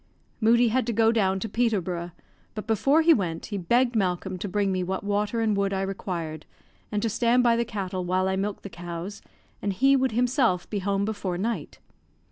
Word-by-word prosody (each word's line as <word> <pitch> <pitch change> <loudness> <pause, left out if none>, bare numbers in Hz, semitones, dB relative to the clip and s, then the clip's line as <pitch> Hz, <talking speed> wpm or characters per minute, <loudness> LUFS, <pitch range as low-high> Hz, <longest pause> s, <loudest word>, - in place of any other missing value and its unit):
Moodie 235 +1 +4
had 250 +1 0
to 235 - 0
go 225 +1 +4
down 195 -4 +1
to 225 - -2
Peterborough; 190 -7 -1 0.5
but 215 - -5
before 275 +8 +3
he 330 +1 +7
went, 170 - -2
he 205 - -4
begged 240 +7 +2
Malcolm 185 -2 0
to 200 - -4
bring 200 0 0
me 185 -1 0
what 190 +2 -3
water 205 +3 0
and 220 -2 +2
wood 200 0 0
I 190 0 -1
required, 170 -5 -4 0.4
and 210 -1 -1
to - - +2
stand 235 +3 +2
by 235 -1 +4
the 235 - +1
cattle 190 -4 -4
while 185 +1 +1
I 190 - 0
milked 200 +1 -3
the 200 - -6
cows, 175 +3 -7 0.4
and 200 - -1
he 270 +8 +4
would 265 -3 +1
himself 245 - +1
be 205 - -3
home 200 +1 0
before 205 -4 -3
night. 225 +5 -3
205 Hz, 205 wpm, -26 LUFS, 185-230 Hz, 0.5 s, he